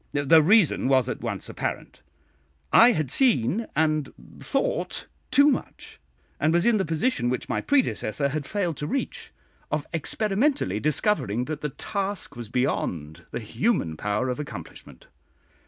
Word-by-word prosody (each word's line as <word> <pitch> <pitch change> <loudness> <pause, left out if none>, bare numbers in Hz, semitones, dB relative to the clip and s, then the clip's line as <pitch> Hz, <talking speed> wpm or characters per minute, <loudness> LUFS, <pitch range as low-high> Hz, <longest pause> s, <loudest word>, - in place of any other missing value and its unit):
The 145 +3 +5
reason 180 -4 +4
was 130 -2 +3
at 130 - -4
once 110 -5 -4
apparent - - -5 0.7
I 240 +1 +8
had 155 - -2
seen 220 - +2
and 155 -1 +1 0.3
thought - - -1 0.2
too 285 +1 +5
much; 285 - -3 0.4
and 155 - +2
was 175 +1 +2
in 235 -2 +4
the 190 - 0
position 160 - 0
which 125 -1 -3
my - - -1
predecessor 150 - 0
had 145 0 -4
failed 180 -6 -2
to 150 - -4
reach, 275 +2 -4 0.4
of 150 -1 -1
experimentally 205 - 0
discovering 140 - +1
that 155 0 -5
the 150 - -2
task 195 0 -4
was 120 -3 -7
beyond 85 - -2
the - - -4
human 115 - -1
power 105 +8 -1
of 125 - -3
accomplishment. 140 - -9
150 Hz, 145 wpm, -25 LUFS, 125-205 Hz, 0.7 s, I